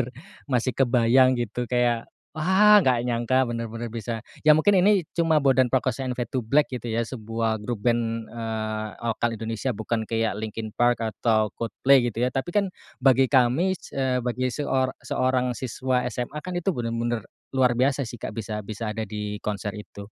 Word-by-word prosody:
bener-bener 120 - -1 0.4
masih 125 -1 +1
kebayang 130 0 +4
gitu, 120 +1 -2
kayak 120 -2 +1 0.2
wah 190 +6 +5
gak 125 -9 +2
nyangka 120 +2 +1
bener-bener 115 -1 -4
bisa. 115 0 -5 0.2
Ya 150 - +9
mungkin 190 +5 +4
ini 200 +1 +4 0.2
cuma 160 -3 +3
Bondan 130 -2 +4
Prakoso 130 +1 -1
and 125 - -2
Fade2Black 125 +4 0
gitu 125 -2 -5
ya. 115 0 0
Sebuah 115 -1 -2
grup 105 0 -5
band, 115 -2 0
eee, 110 -2 -3 0.2
lokal 115 0 -1
Indonesia, 115 +3 -3
bukan 110 +1 -2
kayak 115 -2 -1
Linkin 110 0 -5
Park 120 +1 +1
atau 110 -1 +1
Coldplay 120 +3 +3
gitu 120 +1 -2
ya, 125 - +2
tapi 135 +8 -3
kan 200 -2 +2 0.3
bagi 130 0 +5
kami, 135 +9 +3
s - - -13
c - - -7
eee, 130 -1 +1
bagi 125 +1 -1
seor 130 0 -1
seorang 125 -1 0
siswa 130 0 -1
SMA 125 +5 -4
kan 180 +4 -6
itu 175 +2 0
bener-bener 115 - -2 0.2
luar 130 -2 +3
biasa 135 +1 +1
sih 115 - -8
Kak, - - -6
bisa 105 -1 -5
bisa 110 +1 -5
ada 110 - -3
di 105 -1 -5
konser 105 0 -3
itu 100 -1 -9
120 Hz, 175 wpm, -25 LUFS, 115-130 Hz, 0.4 s, Ya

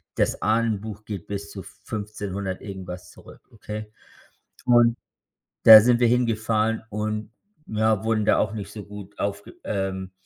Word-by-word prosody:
das - - 0
Ahnenbuch 110 -1 -1
geht 100 -5 -6
bis 100 0 -5
zu 95 - -8
Fünfzehnundert-irgendwas 95 -2 -6
zurück, - - -15
okay? 105 -1 -7 0.8
Und 120 -1 +5 0.7
da 110 -1 +12
sind 120 +2 +3
wir 120 - +5
hingefahren 115 -2 +1
und, 105 0 -3 0.4
ja, 110 -1 +1
wurden 110 -1 +1
da - - +4
auch 105 - 0
nicht 105 -2 -6
so 105 -2 -8
gut 105 -1 -11
aufge 100 0 -4
ähm, 95 -2 -3
105 Hz, 135 wpm, -24 LUFS, 100-110 Hz, 0.8 s, da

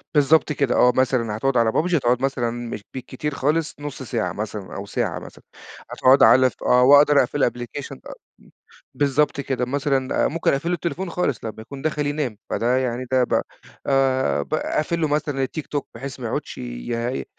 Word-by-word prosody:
بالضبط 150 +2 +4
كده، 140 -4 0
آه، 125 - +5
مثلًا 120 -5 +1
هتقعد 135 +3 0
على 115 -1 +3
PUBG؟ 175 +7 +1
هتقعد 125 -3 +1
مثلًا 130 -3 0 0.2
مش 105 - -6
بكتير 130 +3 -5
خالص 150 +3 0
نص 145 -2 -6
ساعة 115 -3 -2
مثلًا 105 -2 -6
أو 100 - -5
ساعة 100 - -2
مثلًا، - - -13 0.5
هتقعد 130 +2 +5
على 130 +3 +6
ف - - -17
آه، 125 0 +4
وأقدر 145 +2 +7
أقفل 130 - -2
الأبلكيشن 125 +1 -3
أ - - -9 0.3
أم - - -20 0.4
بالضبط 145 +1 +1
كده. 130 -2 -2
مثلًا 135 0 0
ممكن 165 +3 0
أقفل 145 +5 -1
له 175 - +1
التليفون 175 +2 -4
خالص، 165 -8 -2
لمّا 110 - -5
يكون 135 +4 -9
داخل 150 -1 -1
ينام. 145 -7 -2
فده 125 +2 +1
يعني 125 -1 -2
ده 130 -1 +4
بقى - - +1 0.4
آآ، 135 -1 +2
باقفل 155 +2 -2
له 155 - +2
مثلًا 145 -2 -1
التيك 145 +3 -5
توك، 145 -1 -3
بحيث 135 +3 -7
ما 120 - -4
يقعدش - - -4
ي 115 - -4
135 Hz, 185 wpm, -22 LUFS, 120-145 Hz, 0.5 s, وأقدر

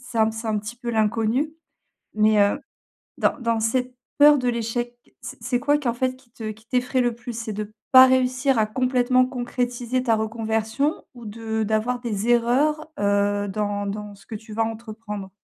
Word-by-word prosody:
c'est 230 - -2
un 220 0 +4
c'est 225 +1 -6
un 215 -1 +1
petit 215 +3 -7
peu 240 -1 -7
l'inconnu. 225 +6 +1 0.6
Mais, 215 0 +4
heu, 200 +7 +2 0.6
dans - - +1
dans 230 -2 0
cette 250 +3 0 0.2
peur 295 0 +7
de 250 -1 0
l'échec, 240 +1 -3 0.2
c'est - - -8
c'est 245 -2 0
quoi 290 +1 +3
qui, 285 -4 -4
en 235 - +2
fait, 255 +1 -1
qui 260 -2 -25
te 220 -2 -5
qui 220 +2 -16
t'effraye 250 +1 +1
le 240 -2 0
plus? 240 +1 -7
C'est 225 -2 -4
de 215 +1 -5 0.2
pas 260 0 +10
réussir 260 +1 +2
à 220 - +3
complètement 255 +2 +2
concrétiser 245 0 -2
ta 230 -3 +2
reconversion 225 +5 -1
ou 240 -2 -12
de 220 +1 -3
d'avoir 220 +4 0
des 220 -2 -3
erreurs, 270 +7 +2
heu, 205 0 +1
dans 205 0 -2
dans 205 0 -5
ce 195 - -20
que - - -9
tu 220 +1 -10
vas 225 +1 +1
entreprendre? 220 -3 -6
230 Hz, 190 wpm, -23 LUFS, 215-250 Hz, 0.6 s, pas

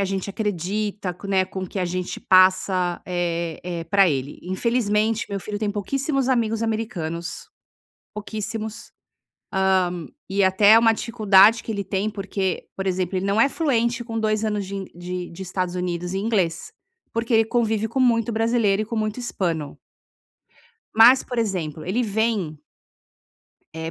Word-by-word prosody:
a 200 - +2
gente 195 0 -3
acredita, 200 -1 -3
né, 190 -1 +3
com 190 0 -7
o 185 - -4
que 195 - -5
a 185 - 0
gente 180 +1 -3
passa, 185 -1 +3
eh 170 -2 -2
eh, 175 -2 -4
pra 195 +3 +4
ele. 140 -2 -3
Infelizmente, 215 +2 0
meu 200 - -2
filho 205 +2 -5
tem 210 -1 -1
pouquíssimos 270 +6 -1
amigos 225 -2 +1
americanos, 215 - -4 0.7
pouquíssimos. 215 +1 -5 1.2
Hã, - - -30 0.2
e 195 0 +2
até 190 +2 +5
é 225 - +9
uma 225 -1 +5
dificuldade 220 -1 +4
que - - -4
ele 200 -2 -2
tem, 195 +2 -1
porque, 195 -2 -3
por 195 0 -3
exemplo, 185 0 -1
ele 185 - -2
não 200 +2 +1
é 255 - +6
fluente 240 -6 0
com 225 -1 -4
2 215 0 0
anos 210 -2 -1
de 195 +1 -6
in 195 -1 -4
de 180 0 -5
de 180 +3 -8
Estados 185 0 -3
Unidos 180 0 -3
em 195 +2 -2
inglês, 180 -8 -1 0.4
porque 230 +1 -1
ele 225 0 +5
convive 225 -2 0
com 260 +4 -3
muito 235 -2 +3
brasileiro 220 -2 +2
e - - -3
com 230 - -5
muito 215 +2 -2
hispano. 170 -11 -3 1.2
Mas, 240 +4 +7
por 245 - -5
exemplo, 175 -8 -2
ele 225 +7 0
vem 205 -8 -1 1.1
Eh, 160 0 -4
200 Hz, 165 wpm, -23 LUFS, 185-225 Hz, 1.2 s, é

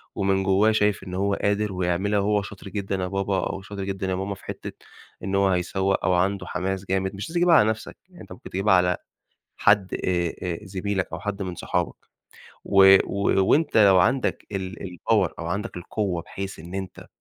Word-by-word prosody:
ومن 95 0 +1
جوّاه 95 +3 +3
شايف 105 -2 +1
إن 90 -1 -8
هو 100 +1 0
قادر 100 +1 0
ويعملها 95 +3 0
وهو 105 +1 +1
شاطر 100 0 -9
جدًا 100 0 -3
يا 90 -1 -2
بابا 95 0 -1
أو 95 - -5
شاطر 100 0 -7
جدًا 95 0 -3
يا 95 - 0
ماما 95 +2 -3
في - - -18
حتّة - - -6 0.5
إن 95 +1 -2
هو 100 0 +3
هيسوّق 95 +2 0
أو 95 - +3
عنده 95 +3 +1
حماس 95 +1 -3
جامد، 95 +1 -1
مش 100 - -6
لازم - - -9
تجيبها 175 -1 +5
على 110 -7 +5
نَفْسك، 110 0 -5
يعني 180 - -15
أنت - - -13
ممكن 90 - -10
تجيبها 95 +2 +2
على 90 -1 +3 0.6
حد 100 -2 +3
آآ 85 -2 -1
آآ 90 -2 -2
زميلك 95 0 -2
أو - - -4
حد 105 0 -4
من 90 -2 -4
صحابك - - -2 0.7
و 95 0 +7
و 100 -1 +1
وأنت 155 0 +3
لو 100 -3 +7
عندك 125 +9 +1
ال 95 +1 -4
الpower 95 0 0
أو 85 - -5
عندك 100 +4 -3
القوّة، 90 -1 -2
بحيث 95 +3 -7
إن 85 +4 -10
أنت 95 -1 -6
95 Hz, 200 wpm, -24 LUFS, 95-100 Hz, 0.7 s, و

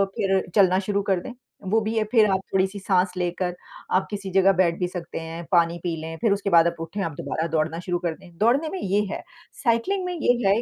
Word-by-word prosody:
फिर 195 -1 +1
चलना 190 -3 +5
शुरू 200 +1 -1
कर 190 - +3
दें, 255 - -8 0.4
वो 220 +3 +4
भी 215 +1 -2
है 220 - +3
फिर 225 -3 +6
आप 190 - +2
थोड़ी-सी 190 +1 +1
साँस 185 -1 +2
लेकर 180 0 -2 0.4
आप 190 - +2
किसी 200 -2 -5
जगह 195 +1 +5
बैठ 175 -2 +2
भी 180 - 0
सकते 175 -2 -6
हैं, 165 +1 -6
पानी 170 -1 +3
पी 170 -2 -1
लें, 165 +1 -6
फिर 225 - +3
उसके 200 0 -2
बाद 170 -1 +6
आप 170 - -1
उठें, 165 +5 -5
आप 165 - -2
दोबारा 160 +1 -2
दौड़ना 160 0 -1
शुरू 175 -1 0
कर 170 -2 -2
दें। 175 -2 -17
दौड़ने 255 +9 +2
में 380 - -5
ये 200 +2 +1
है, - - -4 0.4
साइक्लिंग 275 +11 +1
में 360 - -2
ये 300 -7 +2
है 205 +4 +3
190 Hz, 240 wpm, -24 LUFS, 170-210 Hz, 0.4 s, फिर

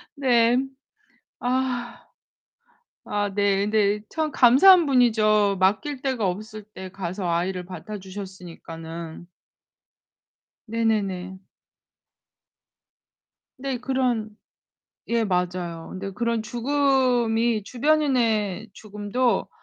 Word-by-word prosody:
네. 245 -4 +3 0.8
아. 250 -1 -2 1.1
아 205 -1 -1
네. 200 -1 +2
근데 210 -1 +1
참 315 -2 -1
감사한 305 +9 +7
분이죠. 215 -6 +3
맡길 255 - 0
데가 255 -7 -1
없을 215 +3 -6
때 190 -1 -8
가서 185 0 -4
아이를 180 +2 -1
맡아주셨으니까는. 180 -4 -9 1.4
네네네. 200 -5 -1 2.2
네, 265 -1 -3
그런 250 -4 -1 0.8
예, 235 0 +1
맞아요. 180 -3 -2
근데 195 +1 -5
그런 235 +1 -1
죽음이 240 -2 +1
주변인의 235 -7 +1
죽음도 210 +4 -1
215 Hz, 175 characters per minute, -24 LUFS, 190-245 Hz, 2.2 s, 감사한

